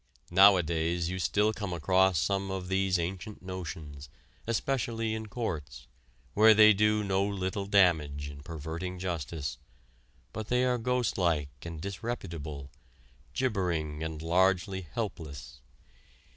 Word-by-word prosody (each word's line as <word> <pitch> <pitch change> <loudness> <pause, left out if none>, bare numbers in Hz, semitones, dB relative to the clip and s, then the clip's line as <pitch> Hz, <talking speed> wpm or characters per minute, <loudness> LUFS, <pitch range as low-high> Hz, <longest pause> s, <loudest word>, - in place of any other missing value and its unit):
Nowadays 85 -3 +4
you 95 - -3
still 105 +4 +2
come 100 -4 -4
across 95 +3 +3
some 95 +4 0
of 95 -1 -4
these 95 -1 +2
ancient 90 +5 -5
notions, 80 -6 -7 0.4
especially 115 -2 -1
in 110 0 -4
courts, 80 - -5 0.5
where 110 +1 +7
they 110 0 +8
do 105 +1 +2
no 95 -1 +1
little 100 0 -2
damage 80 -8 +3
in 70 0 -9
perverting 80 +4 -5
justice, 85 -4 -4 0.7
but 110 0 -5
they 125 +1 +2
are 125 -1 +1
ghost 125 -5 0
like 80 -5 +1
and 85 -2 -7
disreputable, 85 - -5 0.6
gibbering 90 - -1
and 80 -1 -4
largely 95 +2 +2
helpless. 80 -7 -6
95 Hz, 120 wpm, -30 LUFS, 80-105 Hz, 0.7 s, they